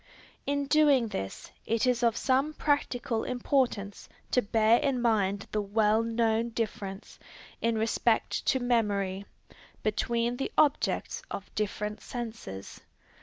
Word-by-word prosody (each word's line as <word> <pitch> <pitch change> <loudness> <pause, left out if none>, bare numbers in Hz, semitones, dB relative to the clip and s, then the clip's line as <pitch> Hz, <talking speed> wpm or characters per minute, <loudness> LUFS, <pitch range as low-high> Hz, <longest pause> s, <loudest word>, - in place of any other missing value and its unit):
In 285 0 0
doing 280 -5 +4
this, 95 - -5 0.2
it 230 +2 +1
is 250 -1 +2
of 235 -1 +2
some 275 +4 +1
practical 245 -6 0
importance 245 -5 -1 0.2
to 250 - +4
bear 220 +1 +3
in 275 -3 0
mind 205 -4 +1
the 210 - 0
well 210 +2 +2
known 230 0 +1
difference, 210 -3 -5 0.4
in 230 -1 +1
respect 225 +1 +1
to 260 - +3
memory, 200 -5 0 0.6
between 235 +3 0
the 270 - -3
objects 305 +9 +2
of 200 - -7
different 210 0 -3
senses. 225 - -7
230 Hz, 120 wpm, -29 LUFS, 210-250 Hz, 0.6 s, doing